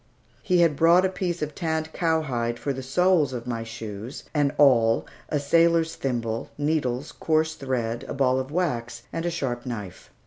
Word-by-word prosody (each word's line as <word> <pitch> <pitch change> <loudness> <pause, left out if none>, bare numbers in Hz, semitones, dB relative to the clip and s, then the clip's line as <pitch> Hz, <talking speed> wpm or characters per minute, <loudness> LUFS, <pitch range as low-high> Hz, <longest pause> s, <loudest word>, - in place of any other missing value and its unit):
He 180 -2 +3
had 165 -3 +4
brought 170 +5 +5
a - - +2
piece 175 -3 -2
of 150 0 -4
tanned 160 -1 -2
cowhide 135 -9 0
for 140 - -2
the 130 - -5
soles 155 +1 +2
of 120 -1 -5
my 115 -2 -3
shoes, 115 +1 -7
an 145 -2 +2
awl, 115 -6 +4 0.2
a 150 - 0
sailor's 165 +2 +3
thimble, 115 -4 -3
needles, 145 -3 -1
coarse 160 0 +1
thread, 120 -5 -2
a - - -4
ball 130 -1 +2
of 130 0 -4
wax, 120 -9 -2
and 165 +1 -2
a - - +2
sharp 135 -8 -3
knife. 105 -7 -7
140 Hz, 175 wpm, -25 LUFS, 120-160 Hz, 0.2 s, brought